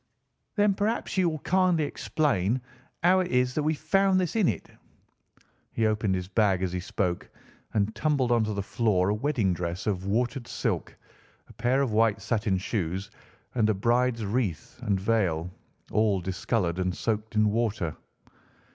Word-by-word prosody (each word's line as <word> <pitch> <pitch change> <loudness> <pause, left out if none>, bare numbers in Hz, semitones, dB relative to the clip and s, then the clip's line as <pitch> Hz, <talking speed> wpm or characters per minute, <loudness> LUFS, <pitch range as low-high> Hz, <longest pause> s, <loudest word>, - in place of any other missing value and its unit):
"Then 205 -2 +4
perhaps 210 +4 -1
you 185 -3 +3
will 155 - -3
kindly 180 0 +2
explain 130 - 0 0.4
how 185 +2 +5
it 185 - 0
is 125 0 +2
that 155 - 0
we 155 +1 +1
found 190 +5 +2
this 180 0 -1
in 215 -6 +3
it?" - - -2 1.1
He 115 - +1
opened 105 -3 +1
his 90 -1 -3
bag 100 -2 +2
as 90 -1 -1
he 90 - -1
spoke, 90 -1 -2 0.5
and 105 +1 +1
tumbled 140 -3 +1
onto 110 -3 +2
the 100 - -2
floor 100 -2 +1
a - - +2
wedding 110 -5 +1
dress 90 +1 -4
of 95 -2 -1
watered 120 +4 -1
silk, - - -2 0.5
a - - -15
pair 130 +3 +1
of 125 -5 -2
white 110 -2 +3
satin 105 -1 0
shoes 95 -1 -3 0.4
and 110 -3 +2
a 110 - +2
bride's 120 +2 +1
wreath 100 - -2
and 100 -2 0
veil, 95 -5 0 0.4
all 105 -3 +2
discoloured 90 0 -1
and 90 -1 -1
soaked 110 -1 -2
in 105 -1 +3
water. 105 -8 -1
110 Hz, 165 wpm, -27 LUFS, 95-130 Hz, 1.1 s, how